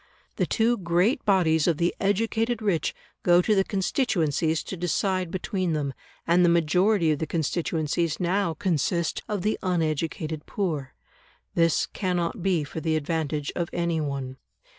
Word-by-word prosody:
The - - +1
two 235 +1 +2
great 180 +9 +1
bodies 165 -6 +3
of 165 -3 +2
the 170 +1 +1
educated 225 +3 0
rich 195 -8 0 0.3
go 175 0 +5
to 215 +4 +2
the 195 -2 +3
constituencies 170 - 0
to - - -6
decide 185 +1 0
between 185 -1 -2
them, 145 -3 -2 0.3
and 175 +2 +4
the 175 - +5
majority 170 +2 +3
of 150 - -1
the 160 - -2
constituencies 160 0 -1
now 180 -1 0
consist 170 -1 0
of 205 -4 -2
the 215 - 0
uneducated 160 -3 -2
poor. 155 -10 -3 0.6
This 165 -1 +3
cannot 180 -3 -2
be 180 -4 +1
for 145 +3 -6
the 160 -1 0
advantage 155 -2 -2
of 170 -1 -2
any 170 -2 0
one. 135 -3 -4
170 Hz, 150 wpm, -26 LUFS, 160-190 Hz, 0.6 s, go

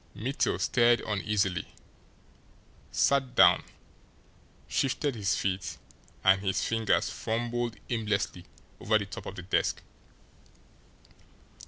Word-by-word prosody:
Mittel 130 +6 -1
stirred 120 -1 +3
uneasily, 100 -4 -1 1.3
sat 135 -2 +2
down, - - +7 1.1
shifted 140 +1 0
his 100 -5 0
feet, 95 -1 -2 0.5
and 95 0 +5
his 95 -1 0
fingers 115 -2 +1
fumbled 120 +1 -2
aimlessly 105 -6 -2 0.3
over 110 +1 +2
the 105 - -3
top 95 - -8
of 95 - -6
the 90 - -7
desk. 90 - 0
110 Hz, 100 wpm, -29 LUFS, 95-120 Hz, 1.3 s, down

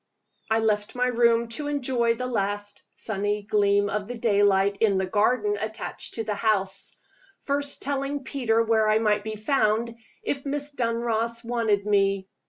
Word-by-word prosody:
I 220 - +3
left 210 -1 0
my 250 0 +1
room 235 -1 +3
to 290 +5 -2
enjoy 250 -5 +1
the 250 - -4
last 205 -3 -2
sunny 205 -1 -2
gleam 205 -1 +2
of 200 0 -3
the 245 0 -6
daylight 200 -3 +2
in 205 -4 +3
the 190 - 0
garden 205 +2 +1
attached 215 0 -5
to 225 - -2
the 215 -1 -2
house; 195 -2 -1 0.5
first 285 0 -1
telling 280 0 -2
Peter 235 -5 +1
where 220 -1 +2
I 215 - +4
might 210 -2 +1
be 220 0 -4
found, 225 0 +1 0.3
if 275 -1 -2
Miss 290 +1 -3
Dunross 230 -2 -1
wanted 225 -4 0
me. 195 -2 +1
220 Hz, 160 wpm, -25 LUFS, 205-240 Hz, 0.5 s, I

